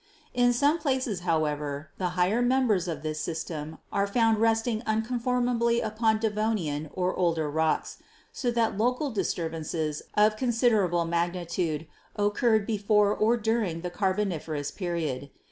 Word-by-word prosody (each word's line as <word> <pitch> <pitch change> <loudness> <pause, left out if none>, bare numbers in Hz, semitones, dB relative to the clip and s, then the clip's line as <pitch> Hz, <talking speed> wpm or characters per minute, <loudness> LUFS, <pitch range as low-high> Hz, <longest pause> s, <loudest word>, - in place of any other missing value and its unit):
In 245 0 +4
some 285 +7 +2
places, 260 - -1
however, 150 -3 -1
the 180 -2 0
higher 190 +7 +2
members 245 -7 +2
of 165 -2 -4
this 155 0 -3
system 160 -1 -4
are 200 0 +1
found 225 +1 +2
resting 225 0 +1
unconformably 235 +1 +1
upon 220 0 +1
Devonian 210 -9 -1
or 185 0 0
older 165 -4 +1
rocks, 160 +1 0 0.4
so 250 - -1
that 230 -3 0
local 250 +5 +1
disturbances 160 -5 -2
of 215 +1 +4
considerable 220 -8 +2
mag 170 +1 0
nitude 170 -3 -2 0.3
occurred 210 +1 +2
before 210 -1 +2
or 225 +3 +3
during 220 -7 -1
the 180 0 -4
Carboniferous 175 -7 -1
period. 160 -7 -3
205 Hz, 130 wpm, -27 LUFS, 165-230 Hz, 0.4 s, In